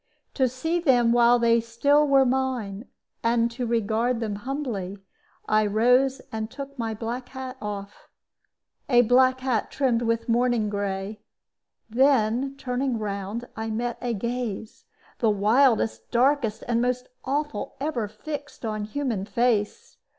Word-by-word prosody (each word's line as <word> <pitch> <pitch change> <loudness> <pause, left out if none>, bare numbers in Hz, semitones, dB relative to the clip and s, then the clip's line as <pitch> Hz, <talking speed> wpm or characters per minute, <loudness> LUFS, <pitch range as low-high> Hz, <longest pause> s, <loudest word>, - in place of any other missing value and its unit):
To 260 -2 +2
see 320 +8 -1
them 245 -8 +4
while 240 0 +5
they 235 -1 +3
still 280 +6 +2
were 275 -1 +5
mine, 250 -5 -1 0.4
and 230 0 +2
to 245 +1 -3
regard 230 +1 0
them 215 -3 -2
humbly, 225 -6 -4 0.5
I 215 0 +3
rose 250 +6 +3
and 220 0 -3
took 275 +2 -8
my 225 -1 -2
black 240 +3 -5
hat 260 -1 -7
off 205 -1 -7 0.8
a 245 -2 +6
black 255 +2 +4
hat 250 -5 0
trimmed 250 -4 +1
with 230 -1 -1
mourning 235 -2 +1
gray. 200 +1 -3 0.7
Then 260 +1 +2
turning 255 -1 -1
round, 205 +2 -4
I 220 0 -4
met 235 +2 -2
a 240 -2 -1
gaze, 235 -1 -4 0.3
the 225 - +3
wildest, 225 +3 +2
darkest, 245 -3 +2
and 235 -1 +1
most 250 0 -1 0.2
awful 285 -4 -2
ever 270 -7 -2
fixed 290 +5 -7
on 215 -1 -2
human 225 -4 -2
face. 240 - 0
235 Hz, 135 wpm, -25 LUFS, 220-260 Hz, 0.8 s, a